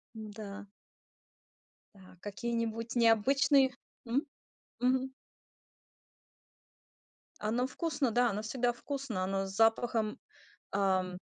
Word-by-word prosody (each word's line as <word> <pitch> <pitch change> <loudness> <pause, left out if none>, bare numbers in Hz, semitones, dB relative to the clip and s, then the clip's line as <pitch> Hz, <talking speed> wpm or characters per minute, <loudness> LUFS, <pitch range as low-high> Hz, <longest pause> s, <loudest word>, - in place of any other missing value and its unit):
М-да. 210 -1 -8 1.3
Да, 185 -2 -16
какие-нибудь 230 +2 -3
необычные 265 +4 +5 0.4
м? 245 +5 +1 0.6
Мгм. 260 +1 +2 2.3
Оно 235 +4 0
вкусно, 290 -2 -1
да, 245 +1 +3
оно 205 +1 -3
всегда 240 +2 0
вкусно. 255 -5 -4
Оно 195 +1 -1
с 190 - -7
запахом, 225 0 +2 0.6
эм 185 -2 +1
225 Hz, 85 wpm, -32 LUFS, 205-250 Hz, 2.3 s, необычные